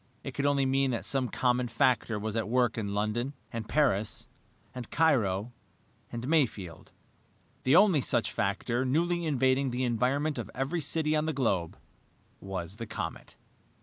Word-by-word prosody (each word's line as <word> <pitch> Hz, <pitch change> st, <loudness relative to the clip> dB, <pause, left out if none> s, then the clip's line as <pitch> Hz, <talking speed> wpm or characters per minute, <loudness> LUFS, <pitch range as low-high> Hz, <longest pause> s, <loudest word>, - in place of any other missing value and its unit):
It -, -, -6 dB
could 140 Hz, -, 0 dB
only 140 Hz, -1 st, +2 dB
mean 135 Hz, 0 st, +2 dB
that 120 Hz, -3 st, -2 dB
some 130 Hz, -3 st, +1 dB
common 125 Hz, 0 st, +1 dB
factor 120 Hz, -1 st, +1 dB
was 105 Hz, +1 st, -4 dB
at 110 Hz, -1 st, -1 dB
work 120 Hz, -1 st, +2 dB
in 100 Hz, -3 st, -3 dB
London, 115 Hz, +7 st, -1 dB, 0.2 s
and 115 Hz, -2 st, -5 dB
Paris, 120 Hz, -9 st, +1 dB, 0.5 s
and 125 Hz, -2 st, -7 dB
Cairo, 120 Hz, -9 st, +2 dB, 0.6 s
and 120 Hz, +1 st, -5 dB
Mayfield. 115 Hz, -, 0 dB, 0.7 s
The 130 Hz, +4 st, +5 dB
only 185 Hz, -6 st, +6 dB
such 120 Hz, -2 st, 0 dB
factor 110 Hz, +5 st, -1 dB
newly 170 Hz, +5 st, +1 dB
invading 130 Hz, -1 st, +2 dB
the 125 Hz, +1 st, -2 dB
environment 130 Hz, +5 st, 0 dB
of 110 Hz, -3 st, -5 dB
every 140 Hz, +6 st, -1 dB
city 155 Hz, +1 st, 0 dB
on 155 Hz, +1 st, 0 dB
the 160 Hz, -, 0 dB
globe 100 Hz, -, 0 dB, 0.6 s
was 95 Hz, 0 st, -5 dB
the 115 Hz, -1 st, -6 dB
comet. 110 Hz, -, -6 dB
125 Hz, 155 wpm, -29 LUFS, 110-140 Hz, 0.7 s, only